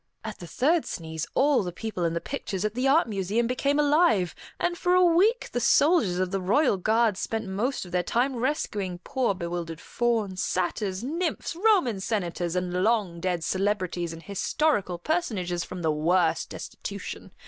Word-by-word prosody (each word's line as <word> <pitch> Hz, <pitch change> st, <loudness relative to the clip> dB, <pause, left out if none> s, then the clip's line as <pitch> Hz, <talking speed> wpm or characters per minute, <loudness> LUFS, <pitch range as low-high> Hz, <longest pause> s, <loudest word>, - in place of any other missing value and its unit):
At 220 Hz, -2 st, -6 dB
the 175 Hz, -, -8 dB
third 310 Hz, -, +1 dB
sneeze, 160 Hz, -1 st, -5 dB
all 280 Hz, 0 st, +4 dB
the 180 Hz, -3 st, -4 dB
people 185 Hz, -2 st, -3 dB
in 165 Hz, 0 st, 0 dB
the -, -, 0 dB
pictures 195 Hz, -4 st, -4 dB
at 210 Hz, -, -1 dB
the 250 Hz, +3 st, 0 dB
Art 295 Hz, +3 st, +4 dB
Museum 205 Hz, +2 st, 0 dB
became 275 Hz, +4 st, 0 dB
alive, 290 Hz, -, +3 dB, 0.3 s
and 350 Hz, 0 st, 0 dB
for 355 Hz, +1 st, +2 dB
a 365 Hz, -, +6 dB
week 375 Hz, +8 st, +3 dB
the 245 Hz, -, -1 dB
soldiers 245 Hz, -, +4 dB
of 185 Hz, 0 st, -1 dB
the 195 Hz, -1 st, -1 dB
royal 210 Hz, +5 st, +3 dB
guard 220 Hz, +1 st, +2 dB
spent 225 Hz, +3 st, -3 dB
most 210 Hz, +6 st, -2 dB
of 180 Hz, -, -12 dB
their 180 Hz, 0 st, +2 dB
time 245 Hz, +9 st, 0 dB
rescuing 215 Hz, -, -2 dB
poor, 250 Hz, -7 st, 0 dB
bewildered 170 Hz, -2 st, -4 dB
fauns, 220 Hz, -6 st, -1 dB
satyrs, 185 Hz, +2 st, -1 dB
nymphs, 330 Hz, +4 st, -2 dB
Roman 355 Hz, -, +3 dB
senators, 180 Hz, -4 st, -2 dB
and 180 Hz, 0 st, -1 dB
long 205 Hz, -6 st, +1 dB
dead 175 Hz, -2 st, -1 dB
celebrities 185 Hz, -3 st, -1 dB
and 165 Hz, 0 st, -9 dB
historical 200 Hz, -, 0 dB
personages 185 Hz, -, -1 dB
from 180 Hz, -2 st, -7 dB
the 160 Hz, -, +2 dB
worst 165 Hz, +2 st, +1 dB
destitution. -, -, -7 dB
205 Hz, 170 wpm, -26 LUFS, 180-270 Hz, 0.3 s, a